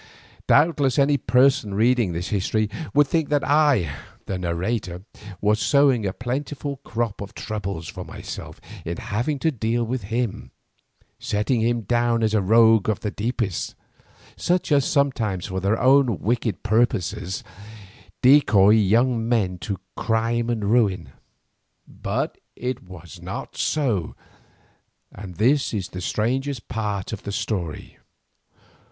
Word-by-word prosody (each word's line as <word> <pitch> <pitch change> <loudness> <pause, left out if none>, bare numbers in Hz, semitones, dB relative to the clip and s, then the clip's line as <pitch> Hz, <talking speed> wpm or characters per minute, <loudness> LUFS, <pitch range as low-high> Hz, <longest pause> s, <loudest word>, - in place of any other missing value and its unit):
Doubtless 145 -4 +3
any 145 +1 +4
person 125 -3 +2
reading 115 -2 +3
this 85 +2 -4
history 105 +1 0 0.2
would 145 0 +4
think 160 +1 0
that 145 -1 +1
I, 145 - +3 0.4
the 95 - -3
narrator, 90 +1 -3 0.4
was 105 +1 +2
sowing 135 -7 +3
a - - -1
plentiful 140 +4 -4
crop 115 -5 -3
of 100 - -8
troubles 100 -6 -5
for - - -7
myself - - -8 0.2
in 85 +1 -4
having 120 +6 -2
to 160 +3 +1
deal 120 -1 -1
with 120 -2 -3
him, 115 +1 -3 0.7
setting 105 +3 0
him 120 +1 +1
down 120 +2 +1
as 110 -1 +1
a 110 - +3
rogue 110 +1 +5
of 105 - -1
the 105 - -2
deepest, 110 -4 -3 0.6
such 180 -2 0
as 140 -2 +4
sometimes, 130 - 0
for 95 -1 -3
their 100 +4 0
own 130 -3 +4
wicked 110 -3 -1
purposes, 105 -4 0 0.8
decoy 110 -7 +6
young 115 +3 +3
men 95 -7 +1
to 100 +4 -4 0.2
crime 115 +1 0
and 110 -4 -1
ruin. 95 - +1 0.8
But - - -3 0.2
it 125 0 -4
was 85 -4 -12
not - - -6
so, 120 - -1 1.0
and 95 -2 -9
this 130 - +2
is 95 -3 -3
the 90 - -7
strangest 130 +8 -2
part 105 -4 -3
of 110 - -5
the 100 - -5
strange 90 -6 -4
story. - - -28
115 Hz, 135 wpm, -23 LUFS, 100-130 Hz, 1.0 s, decoy